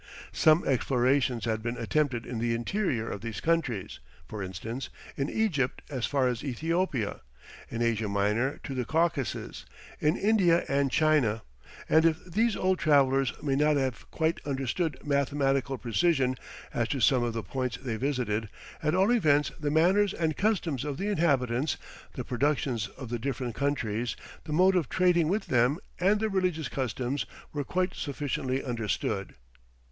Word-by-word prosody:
Some 155 Hz, +2 st, +4 dB
explorations 130 Hz, -2 st, +2 dB
had 110 Hz, -1 st, -1 dB
been 120 Hz, +1 st, -3 dB
attempted 125 Hz, 0 st, 0 dB
in 120 Hz, -2 st, -4 dB
the 115 Hz, 0 st, 0 dB
interior 120 Hz, -, -1 dB
of 100 Hz, -, -5 dB
these 115 Hz, -3 st, -5 dB
countries; 155 Hz, -, -1 dB, 0.3 s
for 105 Hz, -, -6 dB
instance, 105 Hz, +7 st, -5 dB, 0.3 s
in 140 Hz, +1 st, -1 dB
Egypt 155 Hz, -, 0 dB
as 125 Hz, -5 st, -1 dB
far 135 Hz, -3 st, +2 dB
as 125 Hz, -2 st, -2 dB
Ethiopia, 150 Hz, -, -1 dB, 0.5 s
in 115 Hz, 0 st, -2 dB
Asia 115 Hz, -2 st, +1 dB
Minor 105 Hz, +7 st, 0 dB
to 135 Hz, -, -5 dB
the 130 Hz, -1 st, -1 dB
Caucasus, 160 Hz, 0 st, -1 dB, 0.4 s
in 150 Hz, +4 st, +2 dB
India 190 Hz, -5 st, +3 dB
and 140 Hz, 0 st, +1 dB
China; 145 Hz, -7 st, +2 dB, 0.4 s
and 160 Hz, 0 st, +5 dB
if 160 Hz, -1 st, +1 dB
these 215 Hz, +5 st, +1 dB
old 185 Hz, -1 st, +1 dB
travellers 135 Hz, -4 st, +3 dB
may 140 Hz, -2 st, +1 dB
not 150 Hz, +1 st, +3 dB
have 130 Hz, -5 st, -2 dB
quite 160 Hz, +1 st, 0 dB
understood 140 Hz, +2 st, -1 dB
mathematical 140 Hz, -1 st, +1 dB
precision, 130 Hz, +2 st, +1 dB, 0.4 s
as 120 Hz, -1 st, 0 dB
to 135 Hz, -, -2 dB
some 125 Hz, +1 st, +4 dB
of 120 Hz, -1 st, -1 dB
the 115 Hz, -1 st, -3 dB
points 130 Hz, -2 st, -3 dB
they 125 Hz, -4 st, -4 dB
visited, 115 Hz, -4 st, -1 dB, 0.3 s
at 155 Hz, 0 st, +1 dB
all 190 Hz, +5 st, +4 dB
events 150 Hz, -11 st, +3 dB
the 150 Hz, -1 st, -1 dB
manners 185 Hz, +6 st, +3 dB
and 160 Hz, -2 st, 0 dB
customs 175 Hz, -, 0 dB
of 145 Hz, -2 st, -3 dB
the 200 Hz, +2 st, -2 dB
inhabitants, 140 Hz, -, +1 dB, 0.4 s
the -, -, -4 dB
productions 130 Hz, -4 st, 0 dB
of 130 Hz, -4 st, -10 dB
the 120 Hz, 0 st, -2 dB
different 125 Hz, -1 st, -3 dB
countries, 120 Hz, -4 st, -1 dB, 0.3 s
the 155 Hz, -, -6 dB
mode 185 Hz, +5 st, +4 dB
of 170 Hz, -7 st, +1 dB
trading 175 Hz, -3 st, +3 dB
with 200 Hz, +6 st, 0 dB
them, 125 Hz, +4 st, +2 dB, 0.2 s
and 200 Hz, +4 st, +3 dB
their 220 Hz, -, +1 dB
religious 180 Hz, -7 st, 0 dB
customs, 130 Hz, -2 st, -2 dB, 0.3 s
were 145 Hz, -1 st, -2 dB
quite 180 Hz, +5 st, -1 dB
sufficiently 135 Hz, -2 st, -2 dB
understood. 105 Hz, -5 st, -2 dB
135 Hz, 160 wpm, -28 LUFS, 120-160 Hz, 0.5 s, and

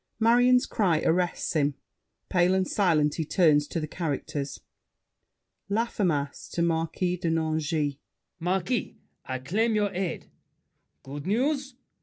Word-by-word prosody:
Marion's 245 Hz, +2 st, +5 dB
cry 180 Hz, -8 st, +1 dB
arrests 175 Hz, +1 st, 0 dB
him; 145 Hz, -3 st, +1 dB, 0.5 s
pale 180 Hz, 0 st, +3 dB
and 190 Hz, 0 st, +1 dB
silent 155 Hz, -7 st, +2 dB
he 160 Hz, -, -2 dB
turns 150 Hz, -3 st, +3 dB
to 170 Hz, -, -3 dB
the 155 Hz, -, -2 dB
characters. 145 Hz, -3 st, -3 dB, 1.1 s
LAFFEMAS 190 Hz, -10 st, -1 dB
(to 170 Hz, -, +1 dB
Marquis 170 Hz, +2 st, 0 dB
de 170 Hz, -1 st, -2 dB
Nangis). 155 Hz, -2 st, 0 dB, 0.4 s
Marquis, 185 Hz, +7 st, -1 dB, 0.3 s
I 130 Hz, -, -3 dB
claim 215 Hz, -, 0 dB
your 205 Hz, -2 st, +1 dB
aid. 185 Hz, -2 st, -3 dB, 0.8 s
Good 140 Hz, +3 st, -7 dB
news! 270 Hz, +5 st, 0 dB
170 Hz, 120 wpm, -27 LUFS, 155-200 Hz, 1.1 s, Marion's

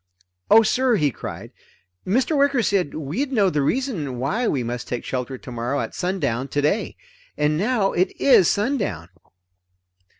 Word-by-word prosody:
"Oh 225 Hz, +1 st, +7 dB
sir!" 250 Hz, +2 st, +2 dB
he 150 Hz, -8 st, +1 dB
cried, -, -, -8 dB, 0.6 s
"Mr. 255 Hz, -, +1 dB
Wicker 280 Hz, -3 st, +2 dB
said 195 Hz, -7 st, 0 dB
we'd 160 Hz, -, -3 dB
know 205 Hz, -7 st, +3 dB
the 150 Hz, -, 0 dB
reason 160 Hz, -, -1 dB
why 200 Hz, -, -1 dB
we 130 Hz, -4 st, 0 dB
must 120 Hz, 0 st, -5 dB
take 120 Hz, -, -4 dB
shelter 130 Hz, 0 st, -4 dB
tomorrow 125 Hz, +3 st, -4 dB
at -, -, -4 dB
sundown 175 Hz, -9 st, -2 dB
today. 145 Hz, +9 st, -1 dB, 0.4 s
And 150 Hz, +1 st, +1 dB
now 205 Hz, +3 st, +1 dB
it 180 Hz, +2 st, +1 dB
is 255 Hz, -, +5 dB
sundown!" 200 Hz, -, -1 dB
180 Hz, 145 wpm, -22 LUFS, -, 0.6 s, Oh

